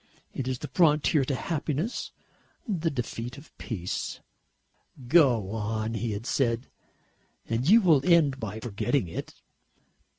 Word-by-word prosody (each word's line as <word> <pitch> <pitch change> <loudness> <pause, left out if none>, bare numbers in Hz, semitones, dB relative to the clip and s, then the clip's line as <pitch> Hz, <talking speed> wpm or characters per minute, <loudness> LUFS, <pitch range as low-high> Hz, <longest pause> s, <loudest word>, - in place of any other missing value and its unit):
It 130 - -4
is 130 -1 -1
the 150 - -6
frontier 150 0 +3
to 135 - -1
happiness, 155 - -2 0.6
the 170 -6 0
defeat 125 -2 -5
of 140 - -15
peace." 95 -6 -4 0.9
"Go 125 - +4
on," 110 0 -2
he 115 -1 -2
had 105 +3 -5
said, 125 -2 0 0.8
"and 120 +6 0
you 225 +3 +8
will 160 -8 +4
end 155 -5 +4
by 110 -2 -5
forgetting 120 +1 -1
it." 85 - -6
130 Hz, 130 wpm, -27 LUFS, 115-150 Hz, 0.9 s, you